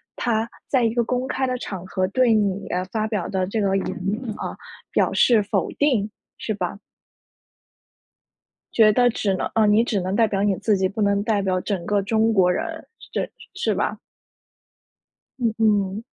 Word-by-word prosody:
他 225 -1 0 0.2
在 255 -3 +2
一 225 - +2
个 240 -1 +2
公 250 +2 -2
开 265 -1 -1
的 255 -1 -1
场 185 -3 -6
合 185 0 -1
对 240 +3 +3
你 200 -2 0 0.2
发 215 +1 -1
表 210 -6 -2
的 190 -1 -1
这 210 +4 -2
个 195 -1 +1
言 - - -2
论 215 +6 -3
啊， - - -5 0.3
表 - - +2
示 225 -4 +4
否 200 - -1
定， 245 -8 +2 0.3
是 215 - -2
吧？ 180 +1 -4 1.9
觉 215 -2 +6
得 245 +3 +4
只 200 -3 0
能 - - -2
啊， 220 -1 +4
你 210 +2 +5
只 215 -5 -1
能 185 +2 -2
代 225 -2 +4
表 195 -1 -1
你 200 -2 +2
自 215 - +2
己， 190 -1 +1
不 215 +3 -4
能 200 0 +2
代 215 -2 +1
表 185 -1 0
整 190 -4 -3
个 205 -1 +1
中 220 +2 +2
国 180 -3 +4
人。 320 - -4
是 - - -15
着 - - -2 0.2
是 - - -1
吧？ - - -1 1.4
嗯 230 -3 +1
嗯。 205 -1 +1
210 Hz, 195 characters per minute, -23 LUFS, 195-230 Hz, 1.9 s, 觉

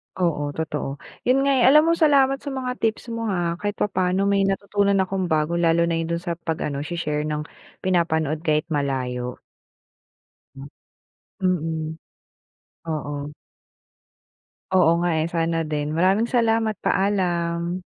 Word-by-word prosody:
Oo, 150 -5 -1
totoo. 150 -3 -3 0.3
Yun 270 +2 +4
nga 280 - +3
eh, - - +4
alam 300 +3 +7
mo, - - +5
salamat 280 -5 +4
sa - - -14
mga 255 -1 -4
tips 225 +1 -1
mo 230 -1 -3
ha. 175 -3 -1
Kahit 205 0 -2
papaano 185 -1 0
may 200 -1 +2
natutunan 200 0 +1
akong 190 -1 -2
bago 160 +2 +1
lalo 170 0 +3
na 170 0 0
yun 165 - -2
dun 170 +1 -2
sa 170 -2 -3
pag-ano 155 -4 -3
she-share 150 -1 -2
ng 150 0 -2 0.4
pinapanood 160 -4 +1
kahit 155 0 +2
malayo. 125 -4 -2 1.1
Hmm. 135 0 -10 0.8
Mm. 160 -3 -1 0.9
Oo. 145 -2 -4 1.4
Oo 180 -3 +5
nga 175 0 +1
eh, - - 0
sana 165 0 0
din. 150 0 -2
Maraming 190 +6 +3
salamat. 225 -2 +2
Paalam. 175 -2 0
170 Hz, 135 wpm, -23 LUFS, 155-200 Hz, 1.4 s, alam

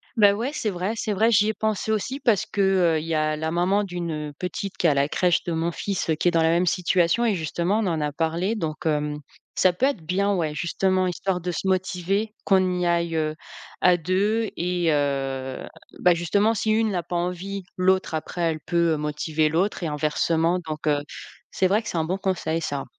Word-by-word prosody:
Bah 205 -3 +6
ouais, 235 +7 -2
c'est 220 - -1
vrai 185 +4 -2
c'est 215 -1 -2
vrai, 220 +4 +3
j'y 210 0 +4
ai - - 0
pensé 220 +1 -1
aussi 235 +6 -2
parce 215 -7 +2
que, 205 - -2 0.3
heu, 155 - +1
il 155 - -6
y 165 - -2
a 155 0 +1
la 160 +1 -3
maman 185 +4 +2
d'une, 175 -3 -4 0.2
heu, - - -12
petite 180 +2 -4
qui 170 - +2
est - - +5
à 145 - +3
la 140 0 +2
crèche 180 -2 +2
de 175 - -3
mon 165 +1 -1
fils, 195 -1 -3
heu, 160 - +3
qui 175 - -1
est - - +5
dans 165 - +2
la 160 - +3
même 175 +2 +2
situation 180 +3 +2
et 220 -4 +2
justement 175 +5 -1
on 215 - 0
en 160 -3 -1
a 150 0 -1
parlé, 165 +7 -1
donc 160 -7 -4
hem, 150 -1 0 0.4
ça 185 -1 +4
peut 210 +9 +1
être 275 -10 0
bien, 200 +4 +1
ouais, 160 -5 -1
justement, 185 +4 +1
histoire 180 +1 -2
de 180 +1 -2
se 185 - -3
motiver 190 +3 0
qu'on 185 -2 +2
y 180 - 0
aille, 170 -1 0
heu, 155 -1 -1 0.5
à 180 -1 +5
2 200 +6 0
et 175 -1 0
heu, 135 -2 -2 0.3
bah, 180 - +5
justement, 200 +6 +2
si 215 0 0
une 220 0 +2
n'a 180 -3 -2
pas 175 - -5
envie, 180 +3 -3
l'autre 185 -1 +2
après, 165 +3 -4
elle 160 -2 0
peut, 170 0 +1
heu, - - -1
motiver 150 +1 0
l'autre 180 +4 0
et 165 - 0
inversement, 160 +3 +1
donc 155 0 -5
heu, 145 -1 +3 0.5
c'est 190 - +2
vrai 205 +4 +2
que - - -6
c'est - - -3
un 160 - +1
bon 185 +4 -1
conseil, 170 -4 -1
ça. 145 -3 -3
175 Hz, 230 wpm, -24 LUFS, 160-195 Hz, 0.5 s, Bah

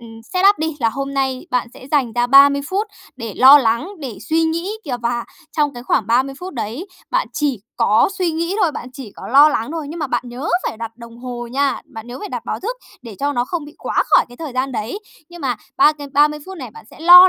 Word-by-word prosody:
ừm, 225 -1 -12
set 365 +1 +1
up 410 - -2
đi 315 -1 -2
là 230 - +3
hôm 275 +4 -4
nay 265 -1 -1
bạn 250 -1 0
sẽ 260 - -12
dành 265 -7 +2
ra 240 +1 +1
30 280 +2 +7
phút 405 +4 0 0.3
để 230 -4 -6
lo 270 +3 +9
lắng, 235 +6 +1
để 250 -9 -6
suy 325 +1 +3
nghĩ 335 +4 -1
kìa, 255 -4 -2
và 235 0 -1 0.3
trong 295 -3 +1
cái 240 - -8
khoảng 225 -4 +1
30 260 +4 +2
phút 365 -2 -7
đấy 240 - -4 0.2
bạn - - +1
chỉ 280 -9 -1 0.2
có 215 - +4
suy 360 -2 +1
nghĩ 335 +4 -2
thôi, 320 -4 +2
bạn 245 - -6
chỉ 250 -6 -9
có - - -8
lo 285 +5 +8
lắng 230 -2 -1
thôi. 320 -3 -4
Nhưng 330 +3 -6
mà 295 - -1
bạn 255 - -1
nhớ 250 +6 -5 0.2
phải - - -6
đặt 230 0 -5
đồng 235 -1 -12
hồ 245 -1 -6
nha, 275 +3 0
bạn 225 0 -10
nhớ 245 +1 -7
phải 415 - -6
đặt - - -4
báo - - -3
thức 475 +6 -3 0.3
để 230 -4 -9
cho 285 +1 0
nó 245 -1 0
không 335 +1 -4
bị 295 +2 -12
quá - - 0
khỏi - - +5
cái 245 - -14
thời 315 -5 -6
gian 255 +1 -1
đấy. 230 - -3 0.3
Nhưng 345 0 -11
mà 255 -5 -1 0.2
ba 335 -3 +6
cái 290 -1 -9
ba 295 +1 +6
mươi 300 0 -6
phút 380 - -8
này 250 -5 -7
bạn - - -13
sẽ - - -15
lo 360 +2 +10
275 Hz, 265 wpm, -19 LUFS, 240-320 Hz, 0.3 s, lo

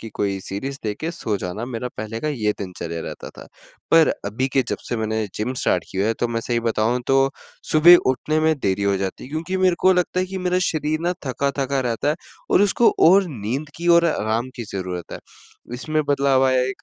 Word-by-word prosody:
की 115 - -7
कोई 100 -1 -1
सीरीज़ 130 +9 -5
देख 105 -1 -2
के 160 - -2
सो 110 -11 -3
जाना, 95 +4 -5
मेरा 125 0 -4
पहले 110 +1 -5
का 155 - -2
ये 110 -8 0
दिनचर्या 85 -3 -5
रहता - - -7
था, - - -13 0.4
पर 165 -1 +6
अभी 110 +6 -1
के 135 0 +2
जब - - -2
से 120 - -1
मैंने 110 -1 -1
जिम 120 +5 -2
स्टार्ट 90 -8 0
किया 95 +2 -1
है 115 - +1
तो 120 - +1
मैं 115 0 -2
सही 120 0 -1
बताऊँ 115 +1 0
तो 135 0 +3 0.4
सुबह 170 +3 +8
उठने 150 +4 -1
में 160 0 +3
देरी 100 -5 -1
हो 100 -1 +2
जाती 95 -1 -4
है 130 - -11
क्योंकि 165 +5 -3
मेरे 185 -1 +3
को 190 - +5
लगता 180 0 0
है 185 - -1
कि 190 +1 -5
मेरा 180 0 0
शरीर 155 0 -1
ना 175 +2 0
थका-थका 140 0 -1
रहता 120 +2 -1
है 150 - +2 0.4
और 195 - +5
उसको 215 +3 +4 0.2
और 195 +3 +6
नींद 130 +3 -4
की 170 - -5
और 170 - +4
आराम 115 -4 -1
की 120 - -4
ज़रूरत 90 -3 -5
है, - - -6 0.6
इसमें 155 +4 -1
बदलाव 140 -2 +3
आया 130 0 +3
है 125 - 0
एक, 130 - -7
130 Hz, 225 wpm, -22 LUFS, 110-155 Hz, 0.6 s, सुबह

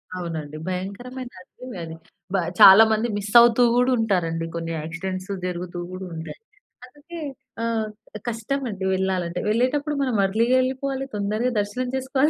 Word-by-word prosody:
అవునండి. 160 -4 -5
భయంకరమైన 240 +8 -5
అడవి 250 +4 -11
అది. 160 0 -7 0.4
బ - - +2 0.2
చాలా 195 +3 +11
మంది 220 +2 +1
మిస్సవుతూ 235 +4 +5
కూడా 250 +1 +3
ఉంటారండి. 165 -6 0
కొన్ని 165 0 -3
యాక్సిడెంట్సు 185 +4 -5
జరుగుతూ 175 0 -4
గూడా 185 +1 -6
ఉంటాయి. 160 0 -7 0.5
అందుకే, 295 +6 -11 0.4
ఆహ్, 225 -2 0 0.4
కష్టమండి 225 -3 -3
వెళ్ళాలంటే 185 -2 -1
వెళ్ళేటప్పుడు 280 +6 +1
మనం 255 -4 0
ఎర్లీ‌గా 230 +6 +2
ఎళ్ళిపోవాలి 265 +1 -2
తొందరగా 215 +5 0
దర్శనం 225 +5 -2
చేసుకోవాలి 265 +3 +1
215 Hz, 125 wpm, -23 LUFS, 185-255 Hz, 0.5 s, చాలా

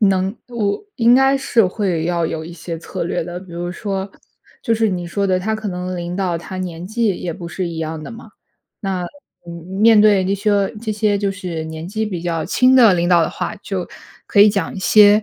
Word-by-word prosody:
能 195 -1 +2
我 210 - -1
应 235 0 +5
该 270 +1 +4
是 240 -6 +2
会 180 -4 -1
要 170 -1 0
有 160 -1 -3
一 170 - -9
些 170 0 -6
策 165 - -5
略 170 - -1
的， 175 +1 -6
比 185 -1 -13
如 175 +1 -4
说， 195 0 -4 0.5
就 230 - +1
是 225 0 +2
你 180 -3 -3
说 200 +3 -1
的， 185 -1 +2
他 220 +4 -1
可 215 -1 -4
能 180 0 -4
领 175 0 -4
导 180 -3 -1
他 185 +3 -8
年 180 -2 -5
纪 230 +2 0
也 175 - -3
不 170 +2 -8
是 175 +1 -3
一 165 - -6
样 160 -1 -4
的 - - -8
嘛。 230 -1 -11 0.5
那， 190 -3 -2 0.4
嗯， 170 - -7 0.3
面 225 -1 +7
对 205 -3 +5
那 195 - +1
些 200 0 +1
这 220 -1 -3
些 210 -1 +1
就 200 -1 0
是 180 -5 -5
年 160 +1 -7
纪 220 +3 -2
比 180 -5 -4
较 165 -2 -2
轻 255 +1 +4
的 230 -7 +7
领 170 -1 +1
导 175 -1 +5
的 160 - +1
话， - - -4
就 195 -3 -4 0.4
可 200 - +3
以 210 - +9
讲 200 -5 -1
一 - - -6
些， 210 +2 +6
190 Hz, 245 characters per minute, -19 LUFS, 175-215 Hz, 0.5 s, 以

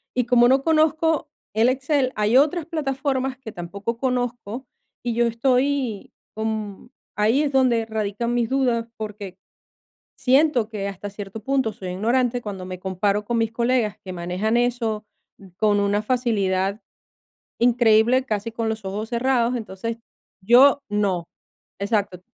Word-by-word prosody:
Y 250 - +1
como 240 0 +5
no 265 +1 +3
conozco 315 -1 +2 0.2
el 220 +3 +3
Excel, 260 0 +1
hay 215 +4 +3
otras 300 +3 +3
plataformas 270 -4 -2
que 255 -4 -9
tampoco 200 +5 -5
conozco 245 -1 -2 0.4
y 240 - -1
yo 235 +1 +2
estoy 250 -1 0 0.2
con 220 -1 -4 0.3
ahí 220 +7 +3
es 285 - -1
donde 250 -4 +3
radican 220 +1 -2
mis 240 -2 0
dudas, 245 -4 +1
porque 210 -3 -7 0.8
siento 265 -4 +3
que 205 -3 -4
hasta 200 +1 -6
cierto 200 +1 -8
punto 265 -3 0
soy 190 - -8
ignorante 240 +6 +1
cuando 195 -4 -6
me 185 -1 -6
comparo 200 +2 -1
con 235 +2 -1
mis 225 -1 0
colegas 235 -2 0
que 185 - -6
manejan 180 +6 -1
eso 235 -3 0 0.5
con 210 -1 +3
una 200 +1 +1
facilidad 205 -5 0 0.8
increíble, 240 +1 +4
casi 215 -2 -2
con 225 0 -2
los 220 -1 -4
ojos 205 +3 -4
cerrados. 245 0 +1
Entonces, 225 0 -5 0.5
yo 265 +7 +6
no. 195 -5 0 0.5
Exacto, 200 -2 -1
230 Hz, 140 wpm, -23 LUFS, 205-255 Hz, 0.8 s, yo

